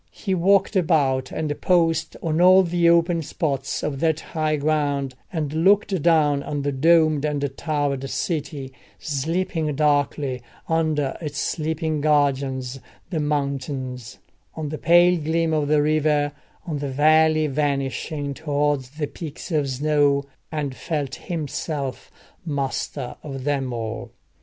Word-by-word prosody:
He 195 - -3
walked 195 +3 +3
about 145 -7 +2
and 150 -2 -3
paused 165 -3 +2
on 165 0 +1
all 185 +1 +7
the 170 -1 +2
open 170 0 +3
spots 140 -4 -2
of 140 -2 -2
that 160 -1 +1
high 155 -2 -1
ground, 145 -2 0 0.2
and 155 -4 -2
looked 190 +2 +3
down 150 -3 +3
on 145 -1 -3
the 145 - 0
domed 155 +1 +3
and 145 -2 0
towered 145 -4 -1
city, 140 -5 -3 0.2
sleeping 160 +1 -2
darkly 145 -3 +1 0.3
under 155 -4 0
its 150 -2 -5
sleeping 160 -1 -1
guardians, 135 -3 +1 0.3
the 165 - -1
mountains; 135 -4 -3 0.4
on 155 -2 -4
the 155 - -5
pale 175 +1 +5
gleam 160 +1 0
of 150 -2 +1
the 150 0 +3
river; 150 -1 +2 0.3
on 155 -5 -3
the 140 -1 -3
valley 155 +3 +4
vanishing 140 0 -2
towards 145 -3 -1
the 155 - 0
peaks 155 +3 -8
of 150 -4 +1
snow; 145 +1 +2 0.3
and 150 -4 -2
felt 145 -4 -3
himself 150 -4 -4 0.3
master 140 -3 -3
of 135 -3 -6
them 135 -2 -1
all. 115 -1 -4
150 Hz, 135 wpm, -23 LUFS, 140-160 Hz, 0.4 s, all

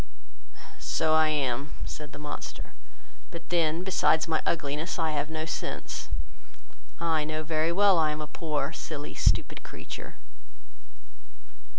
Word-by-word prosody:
"So 160 -1 +2
I 155 0 +6
am, 140 -2 0
(said 150 -1 -6
the - - -9
monster,) 150 0 -6 0.6
but 170 -1 -8
then, 170 -1 +2
besides 170 -4 +3
my 160 -1 +2
ugliness, 155 +1 0
I 160 -2 +1
have 150 0 -1
no 160 0 -2
sense; 160 - -4 0.9
I 160 -2 +2
know 155 +1 -2
very 160 +1 +1
well 195 +1 +6
that - - +5
I 155 - +4
am 150 - -3
a - - -2
poor, 150 -1 -2
silly, 150 -2 -5
stupid - - +3
creature." - - -8
155 Hz, 135 wpm, -29 LUFS, 150-165 Hz, 0.9 s, I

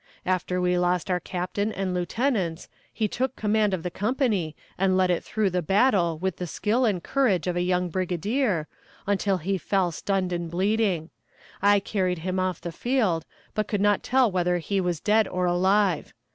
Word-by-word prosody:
After 180 0 0
we 180 0 +2
lost 180 +1 0
our 180 - +1
captain 185 +4 -3
and 190 -2 -2
lieutenants 180 -2 -1 0.2
he 220 - -1
took 255 +5 -2
command 210 -1 +1
of 185 -4 -2
the 180 - -3
company, 205 - 0 0.2
and 185 0 +2
led 185 -1 +3
it 175 - 0
through 210 -3 0
the 180 0 0
battle 190 -2 +2
with 185 +1 -2
the 180 - -4
skill 225 +9 0
and 190 -6 0
courage 215 - +1
of 180 - -1
a 175 - +1
young 180 0 +1
brigadier, 185 - -1 0.4
until 200 -1 +1
he 190 +3 -2
fell 190 -1 +1
stunned 185 +2 -1
and 170 -1 -3
bleeding. 190 -2 0 0.5
I 205 +1 +5
carried 185 -2 -1
him 185 0 -1
off 185 -2 -1
the 170 - -5
field, 215 - 0 0.3
but 215 -1 -1
could 205 - -1
not 205 0 +3
tell 255 -3 +3
whether 180 -1 +1
he 195 +3 -1
was 175 -3 -1
dead 215 +2 +3
or 180 0 -1
alive. 185 0 +2
185 Hz, 185 wpm, -26 LUFS, 180-210 Hz, 0.5 s, I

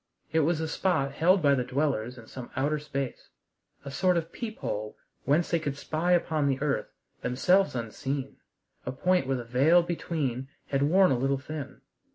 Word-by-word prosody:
It 160 - +3
was 160 +1 +2
a 160 - -1
spot 160 -4 0
held 180 +5 +3
by 140 -1 +5
the 130 -2 +1
dwellers 125 -2 -1
in 115 - -11
some 125 +1 -9
outer 145 +3 +1
space, 140 -3 -5 0.6
a 140 - -5
sort 180 +5 +2
of 165 0 -3
peephole 110 - -5 0.3
whence 150 +5 +2
they 170 - +3
could 145 -3 -3
spy 160 +5 0
upon 160 -4 +2
the 135 -1 +1
earth, 145 -1 0 0.3
themselves 180 +8 +2
unseen, 135 +4 -4 0.5
a 125 - -3
point 180 +2 +1
where 135 -1 +1
the 120 - -5
veil 140 +9 +4
between 150 -7 -2 0.2
had 135 -1 +1
worn 180 +5 +5
a 130 - +2
little 135 +2 +1
thin. 145 0 -7
145 Hz, 180 wpm, -28 LUFS, 130-165 Hz, 0.6 s, by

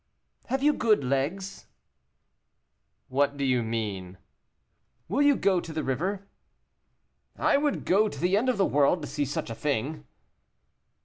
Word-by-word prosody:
"Have 265 +2 -1
you 300 +1 +5
good 215 - +2
legs?" 145 +9 -2 1.4
"What 140 +2 +1
do 140 - -1
you 125 -2 +2
mean?" 105 -5 -4 0.9
"Will - - 0
you 290 -1 +5
go 190 -6 +2
to 165 - -7
the 155 0 -3
river?" 185 +9 -2 1.1
"I - - +3
would 290 0 -1
go 210 +4 +3
to 145 - -9
the 180 +5 +2
end 240 +5 +2
of 250 - +1
the 195 - +3
world 145 +3 +2
to - - -4
see 145 - -2
such 135 -3 -4
a - - -2
thing." 140 +4 -3
155 Hz, 150 wpm, -27 LUFS, 135-200 Hz, 1.4 s, you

